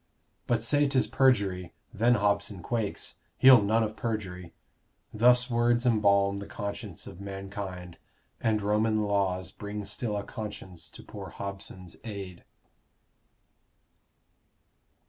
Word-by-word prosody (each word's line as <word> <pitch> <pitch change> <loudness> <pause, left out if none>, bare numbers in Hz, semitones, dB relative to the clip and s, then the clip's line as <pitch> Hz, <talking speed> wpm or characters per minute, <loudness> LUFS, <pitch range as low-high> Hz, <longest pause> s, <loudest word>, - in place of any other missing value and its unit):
But 115 -2 +1
say 145 +4 +3
'tis 135 -2 +2
perjury, 100 -10 +1 0.2
then 120 +3 +4
Hobson 100 -3 0
quakes 115 -1 -3 0.2
He'll 130 -3 +8
none 110 +3 +2
of 110 0 -3
perjury. 95 -8 -4 0.6
Thus 125 +3 +5
words 120 0 +2
embalm 100 -4 +3
The 100 - -7
conscience 100 -3 -6
of 90 - -10
mankind: 95 -3 -7 0.4
and 110 -2 +1
Roman 105 +1 +2
laws 95 -3 0
Bring 105 0 -6
still 105 +1 -2
a 100 - -3
conscience 100 -6 -7
to - - -12
poor - - -8
Hobson's 95 -3 -6
aid. 100 -5 -7
105 Hz, 115 wpm, -28 LUFS, 95-115 Hz, 0.6 s, He'll